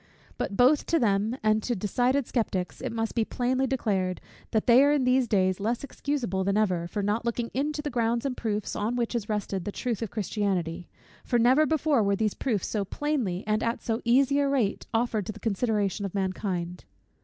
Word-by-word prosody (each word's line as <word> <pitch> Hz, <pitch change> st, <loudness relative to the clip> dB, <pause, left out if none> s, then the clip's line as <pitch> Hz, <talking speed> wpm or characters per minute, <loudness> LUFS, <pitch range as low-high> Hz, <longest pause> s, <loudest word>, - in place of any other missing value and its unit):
But 200 Hz, -, -3 dB
both 265 Hz, +4 st, +4 dB
to 335 Hz, -, +3 dB
them 215 Hz, -1 st, +1 dB
and 215 Hz, 0 st, +3 dB
to 240 Hz, +2 st, -1 dB
decided 245 Hz, +7 st, +1 dB
sceptics 190 Hz, -8 st, -2 dB
it -, -, -3 dB
must 225 Hz, -1 st, -2 dB
be 230 Hz, -, +1 dB
plainly 255 Hz, +3 st, 0 dB
declared, 195 Hz, -8 st, -1 dB, 0.3 s
that 220 Hz, -, 0 dB
they 245 Hz, +3 st, +7 dB
are 285 Hz, -, +4 dB
in 290 Hz, -3 st, +2 dB
these 255 Hz, 0 st, +3 dB
days 185 Hz, -3 st, +2 dB
less 230 Hz, +6 st, -1 dB
excusable 260 Hz, -9 st, -2 dB
than 200 Hz, +2 st, +1 dB
ever, 180 Hz, -5 st, +1 dB
for 205 Hz, +3 st, -3 dB
not 210 Hz, +3 st, 0 dB
looking 235 Hz, 0 st, -2 dB
into 295 Hz, +3 st, -1 dB
the 295 Hz, -, -3 dB
grounds 235 Hz, +1 st, 0 dB
and 265 Hz, -2 st, -1 dB
proofs 215 Hz, -4 st, -3 dB
on 220 Hz, +4 st, -1 dB
which 240 Hz, -1 st, -1 dB
is 225 Hz, -3 st, -3 dB
rested 205 Hz, -3 st, -2 dB
the 205 Hz, -, -4 dB
truth 235 Hz, 0 st, -3 dB
of 225 Hz, -, -2 dB
Christianity; 185 Hz, -5 st, -2 dB, 0.3 s
for 245 Hz, -, +1 dB
never 260 Hz, +6 st, +4 dB
before 310 Hz, -4 st, +2 dB
were 200 Hz, -1 st, +2 dB
these 215 Hz, 0 st, 0 dB
proofs 220 Hz, -9 st, -1 dB
so 210 Hz, -2 st, -1 dB
plainly, 225 Hz, -6 st, -2 dB
and 215 Hz, +1 st, +1 dB
at 230 Hz, 0 st, -1 dB
so 225 Hz, 0 st, -1 dB
easy 270 Hz, +4 st, +3 dB
a 280 Hz, -1 st, +2 dB
rate, 245 Hz, -8 st, 0 dB
offered 225 Hz, -3 st, 0 dB
to -, -, -2 dB
the 215 Hz, -, -12 dB
consideration 210 Hz, -2 st, 0 dB
of 195 Hz, -1 st, -4 dB
mankind. 185 Hz, -2 st, -3 dB
225 Hz, 205 wpm, -27 LUFS, 200-250 Hz, 0.3 s, they